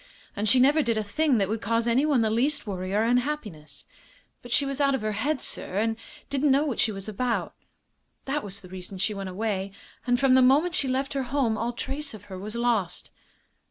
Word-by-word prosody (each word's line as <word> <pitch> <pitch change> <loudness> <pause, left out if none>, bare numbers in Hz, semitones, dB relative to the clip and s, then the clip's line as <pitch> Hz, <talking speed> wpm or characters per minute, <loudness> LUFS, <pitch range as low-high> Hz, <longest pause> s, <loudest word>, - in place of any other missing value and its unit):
And 210 +1 +1
she 255 - +5
never 285 +5 +5
did 230 -5 0
a 215 - 0
thing 265 +6 +1
that 195 -2 +1
would 220 +2 -3
cause 230 +2 0
anyone 265 +2 +3
the 220 -1 +1
least 260 +7 0
worry 185 -2 -4
or 210 +2 +2
unhappiness. 230 - -2 0.6
But 245 - -11
she 280 - +3
was 275 +1 -2
out 275 -1 +3
of 265 - -3
her 215 - 0
head, 265 +7 -1
sir, 185 - -1
and 225 +2 +1 0.3
didn't 280 +1 +1
know 275 +3 +4
what 270 -7 -3
she 220 - +2
was 195 -1 -6
about. 230 +3 -2 0.7
That 285 +2 -1
was 200 0 -6
the 185 - -13
reason 185 +1 -8
she 200 +3 0
went 195 -1 -5
away. 195 0 -2 0.4
And 245 0 +3
from 270 -1 +4
the 260 - +6
moment 290 +8 +4
she 275 - +2
left 265 +1 -1
her 275 - -1
home 260 -5 +1
all 230 +2 -2
trace 275 +2 -4
of 205 - -12
her 185 - -6
was 210 +3 -6
lost." 235 -6 -1
235 Hz, 225 wpm, -26 LUFS, 205-275 Hz, 0.7 s, the